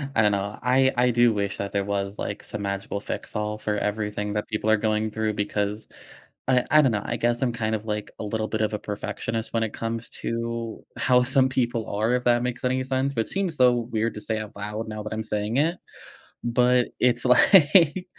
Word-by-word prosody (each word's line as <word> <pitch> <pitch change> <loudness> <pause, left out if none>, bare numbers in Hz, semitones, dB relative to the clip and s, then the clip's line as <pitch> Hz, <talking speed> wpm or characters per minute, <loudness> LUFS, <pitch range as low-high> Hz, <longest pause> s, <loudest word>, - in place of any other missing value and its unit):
I 110 - +4
don't 105 -1 +4
know. 100 +1 -2
I 130 +1 +3
I 125 +1 +3
do 120 -1 +4
wish 100 -1 -2
that 100 0 -4
there 100 -1 0
was, 100 0 -3
like, - - -4
some 105 - -5
magical 100 0 -3
fix - - -6
all 105 0 -2
for 105 -1 -2
everything 105 0 -2
that 105 0 -2
people 110 0 -2
are 110 - +5
going 110 0 0
through 110 0 -1
because, 105 +1 -2 0.6
I 125 -1 +3
I 155 0 +7
don't 130 - +3
know. 105 -2 -1
I 120 - -2
guess 120 +1 0
I'm 130 -2 +1
kind 110 -2 -2
of, 110 0 -6
like, 105 -1 -3
a - - -4
little 110 +1 -2
bit 110 - -1
of 110 0 0
a - - -4
perfectionist 110 +2 -4
when 115 -1 +1
it 110 - -3
comes 115 0 -4
to 115 -1 -4
how 125 -1 +4
some 130 +1 +3
people 120 -3 -1
are, 110 +4 0
if 125 0 0
that 120 0 +3
makes 125 0 -3
any 130 +1 +1
sense. 135 +1 -1
But 115 - 0
seems 190 -4 -2
so 125 -1 +6
weird 115 -1 -1
to 105 - -5
say 110 +1 -1
out 110 0 -8
loud 105 +2 -4
now 110 0 -5
that 105 - -5
I'm 110 0 -3
saying 105 +2 -1
it. 165 +5 +2 0.7
But 125 +1 +3
it's 120 -1 +2
like, 165 +5 +5
110 Hz, 225 wpm, -25 LUFS, 105-125 Hz, 0.7 s, I